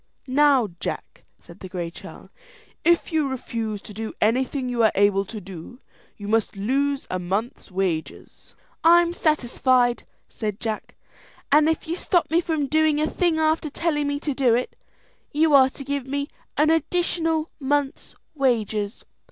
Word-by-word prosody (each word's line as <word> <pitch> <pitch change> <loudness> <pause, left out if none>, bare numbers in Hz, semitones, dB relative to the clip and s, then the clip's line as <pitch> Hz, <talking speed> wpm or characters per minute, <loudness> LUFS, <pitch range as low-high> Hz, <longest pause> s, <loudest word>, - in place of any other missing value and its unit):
"Now, 275 -4 +3
Jack," - - -6
said - - -15
the 185 - -9
Gray 175 -2 -4
Churl, - - -12 0.5
"if 340 0 +2
you 310 -3 +2
refuse 225 -5 -4
to 210 - -10
do 220 +2 -5
anything 255 +4 +1
you 245 -1 0
are 220 - +5
able 200 0 +3
to 215 +2 -7
do, 195 +4 -10 0.4
you 205 - -8
must 220 -1 +1
lose 275 +7 0
a 185 - -1
month's 195 +7 -3
wages." 180 -4 -4 0.3
"I'm 340 +1 +5
satisfied," 255 -6 +1 0.2
said 210 -3 -4
Jack; 220 -2 -4 0.6
"and 300 +2 +5
if 320 - -2
you 330 - -1
stop 350 -2 +1
me 335 +2 +4
from 315 -4 -1
doing 310 +1 +2
a 305 - +2
thing 340 0 0
after 315 0 +1
telling 295 -1 -1
me 285 0 -1
to 295 - -2
do 255 -4 +3
it, 250 - -2 0.6
you 310 +1 +3
are 265 -2 +7
to 275 - -9
give 280 -1 -3
me 280 +1 -2 0.3
an 305 +2 +4
additional 325 -1 0
month's 285 +1 -1 0.2
wages." 225 -6 -1
270 Hz, 160 wpm, -24 LUFS, 220-310 Hz, 0.6 s, are